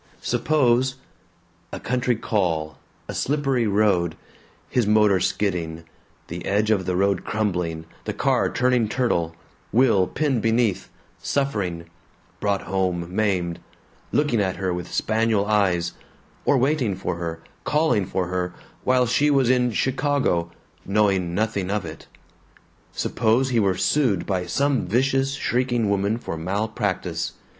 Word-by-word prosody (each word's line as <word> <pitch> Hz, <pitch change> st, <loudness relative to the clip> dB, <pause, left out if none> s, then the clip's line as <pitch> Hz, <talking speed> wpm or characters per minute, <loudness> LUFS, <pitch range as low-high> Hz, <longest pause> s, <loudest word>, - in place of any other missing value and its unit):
Suppose 130 Hz, 0 st, +2 dB, 0.8 s
A -, -, -5 dB
country 125 Hz, 0 st, 0 dB
call, 85 Hz, -8 st, -1 dB, 0.3 s
a -, -, -5 dB
slippery 135 Hz, -5 st, 0 dB
road, 100 Hz, -5 st, +2 dB, 0.5 s
his 120 Hz, -4 st, +1 dB
motor 105 Hz, -2 st, +4 dB
skidding, 85 Hz, -5 st, -1 dB, 0.4 s
the -, -, -6 dB
edge 105 Hz, +2 st, +1 dB
of 95 Hz, -4 st, +1 dB
the 90 Hz, -, 0 dB
road 100 Hz, 0 st, +1 dB
crumbling, 90 Hz, -7 st, -2 dB, 0.2 s
the -, -, -1 dB
car -, -, +1 dB
turning 125 Hz, -2 st, +2 dB
turtle, 85 Hz, -10 st, 0 dB, 0.4 s
Will 115 Hz, -7 st, +4 dB
pinned 140 Hz, -7 st, 0 dB
beneath, 110 Hz, -4 st, +1 dB, 0.3 s
suffering, 100 Hz, -12 st, -1 dB, 0.5 s
brought 100 Hz, -1 st, 0 dB
home 90 Hz, -2 st, -1 dB
maimed, 95 Hz, -6 st, 0 dB, 0.5 s
looking 145 Hz, -7 st, +2 dB
at 95 Hz, -2 st, 0 dB
her 95 Hz, -2 st, -1 dB
with 90 Hz, -1 st, -5 dB
spaniel 110 Hz, -2 st, +1 dB
eyes 95 Hz, -5 st, +1 dB, 0.5 s
or 140 Hz, -, +4 dB
waiting 130 Hz, -6 st, +1 dB
for 90 Hz, -2 st, -3 dB
her, 85 Hz, -1 st, -4 dB, 0.2 s
calling 150 Hz, -, +1 dB
for 95 Hz, -1 st, -1 dB
her, 90 Hz, -1 st, -2 dB, 0.3 s
while 130 Hz, 0 st, +3 dB
she 125 Hz, +5 st, +2 dB
was 135 Hz, -4 st, +3 dB
in 125 Hz, -1 st, +2 dB
Chicago, 130 Hz, -, 0 dB, 0.3 s
knowing 95 Hz, -4 st, +1 dB
nothing 100 Hz, -3 st, -1 dB
of 100 Hz, -2 st, -1 dB
it. 80 Hz, -, -9 dB, 0.8 s
Suppose 120 Hz, +4 st, +1 dB
he 120 Hz, -3 st, +2 dB
were 95 Hz, -3 st, +2 dB
sued 115 Hz, -, +1 dB
by 90 Hz, -3 st, -1 dB
some 140 Hz, -1 st, +1 dB
vicious 135 Hz, +5 st, +1 dB
shrieking 120 Hz, -5 st, 0 dB
woman 100 Hz, +2 st, +1 dB
for 120 Hz, -, -5 dB
malpractice. 100 Hz, +3 st, -2 dB
105 Hz, 130 wpm, -23 LUFS, 90-125 Hz, 0.8 s, motor